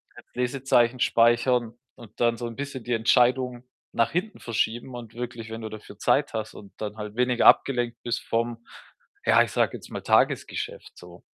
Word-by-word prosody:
als - - -15
Lesezeichen 125 -1 +1
speichern 120 0 +3 0.2
und 115 -4 -15
dann 120 -1 +3
so 120 - -4
'n 115 - -8
bisschen 140 -3 -5
die 120 - -2
Entscheidung 125 +2 +2 0.3
nach 115 -1 +2
hinten 185 +6 -3
verschieben 120 +2 -2
und 115 -2 -9
wirklich, 120 -2 -6
wenn 115 0 -6
du 110 - -5
dafür 110 -1 -11
Zeit 145 -2 +2
hast 110 -1 -4
und 100 - -13
dann 105 0 -4
halt 105 0 -7
weniger 125 -1 +3
abgelenkt 120 -3 +4 0.3
vom 115 0 -1 0.6
ja, - - +6
ich - - -6
sage - - +1
jetzt - - -15
mal - - -5
Tagesgeschäft - - 0
so. 90 0 -13
120 Hz, 175 wpm, -26 LUFS, 115-125 Hz, 0.6 s, ja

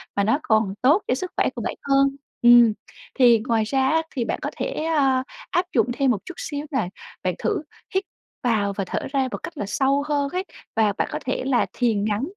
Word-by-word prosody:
mà 200 - +2
nó 225 +8 +2
còn 215 -3 +2
tốt 290 +10 +5
cho 250 - +2
sức 365 +7 -5
khỏe - - +3
của - - -4
bạn - - -3
hơn. 275 0 +4 0.3
Ừm, 240 -2 +8 0.5
thì 240 -3 +6
ngoài 225 -2 +2
ra 265 +4 +1
á 320 +2 +3
thì 245 -3 0
bạn - - -2
có - - -3
thể, - - -2
a, 270 -5 +2 0.3
áp 355 - +2
dụng 230 -1 +4
thêm 260 +1 +2
một 220 - +1
chút 360 - -8
xíu 290 0 -4
nè, 235 -10 0 0.3
bạn 185 -2 0
thử - - 0 0.3
hít 380 - +2 0.4
vào 210 -5 +1
và 195 - -2
thở - - -2
ra 270 -2 +2
một - - -3
cách 335 - -7
là 205 - -2
sâu 275 +7 +1
hơn 285 -2 0
ấy. 365 +5 -2 0.3
Và 215 -2 +3
bạn - - 0
có - - -3
thể 255 - -1
là 260 -3 +2
thiền 220 -5 +1
ngắn, 215 +3 0
255 Hz, 230 wpm, -23 LUFS, 220-280 Hz, 0.5 s, Ừm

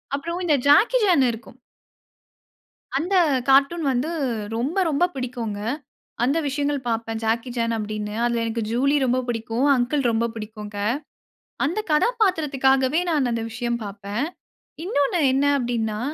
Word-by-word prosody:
அப்புறம் 335 +5 -4
இந்த 310 -4 +4
Jackie 425 +12 +6
Chan 335 -9 +4
இருக்கும். 235 +2 -11 1.4
அந்த 360 +6 0 0.3
கார்ட்டூன் 280 +5 +4
வந்து 260 +6 -1 0.5
ரொம்ப 270 +11 -1
ரொம்ப 305 +2 +2
பிடிக்குங்க. 240 -5 -4 0.6
அந்த 275 +6 +2
விஷயங்கள் 285 +1 -1
பார்ப்பேன் 225 -1 -2
ஜாக்கி 230 +3 0
சான் 230 -1 0
அப்படின்னு. 210 -1 -4
அதில 235 -1 +1
எனக்கு 230 0 -2
ஜூலி 275 +5 +2
ரொம்ப 255 0 +2
பிடிக்கும். 230 +2 -1
அங்கிள் 260 +3 0
ரொம்ப 230 +1 +1
பிடிக்கும். 215 -1 -7 1.0
அந்த 340 +10 -1
கதாபாத்திரத்திற்காகவே 300 - +2
நான் 285 -6 +1
அந்த 230 -1 -2
விஷயம் 235 +1 -2
பார்ப்பேன். 200 +4 -4 0.6
இன்னொன்னு 330 -2 +1
என்ன 270 +2 +2
அப்படின்னா 225 -4 -2
255 Hz, 125 wpm, -23 LUFS, 230-290 Hz, 1.4 s, ஜாக்கி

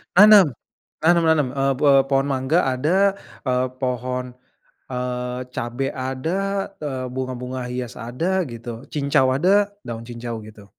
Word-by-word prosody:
Nanam. 205 -1 +9 0.6
Nanam 170 +1 +5
nanam, 150 -4 +3
eee, 135 0 +2
be 145 -1 +4 0.2
pohon 135 0 +2
mangga 135 +3 +1
ada, 175 +10 +2 0.3
eee, 125 0 +2
pohon, 125 0 -3 0.6
eee, 125 0 -3 0.2
cabe 130 +1 -2
ada, 130 +8 -2 0.4
eee, 135 -4 -3
bunga-bunga 130 0 -4
hias 125 -1 -4 0.2
ada 175 +10 0
gitu, 115 +1 -8
cincau 140 -3 +2
ada, 200 +7 +3 0.2
daun 115 -1 -5
cincau 120 -1 -5
gitu. 105 -1 -13
130 Hz, 130 wpm, -22 LUFS, 125-150 Hz, 0.6 s, Nanam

